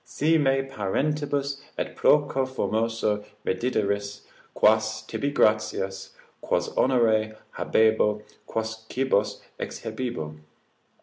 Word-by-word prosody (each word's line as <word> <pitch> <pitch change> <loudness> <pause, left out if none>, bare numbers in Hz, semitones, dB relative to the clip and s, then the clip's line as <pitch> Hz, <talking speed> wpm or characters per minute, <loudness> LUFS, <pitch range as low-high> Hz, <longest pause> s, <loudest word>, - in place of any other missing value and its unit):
Si 145 +6 +1
me 135 -3 +3
parentibus 140 +4 -1 0.2
et - - -3
proco 145 -3 +3
formoso 115 -4 0 0.2
reddideris, 100 -1 -1 0.3
quas, 110 0 +3
tibi 140 +5 -2
gratias, 105 -6 0 0.3
quos - - 0
honores 110 -4 +2 0.2
habebo, 110 -1 +2 0.2
quos 110 0 -4
cibos 130 -6 0 0.2
exhibebo? 80 -12 -5
110 Hz, 85 wpm, -26 LUFS, 105-135 Hz, 0.3 s, me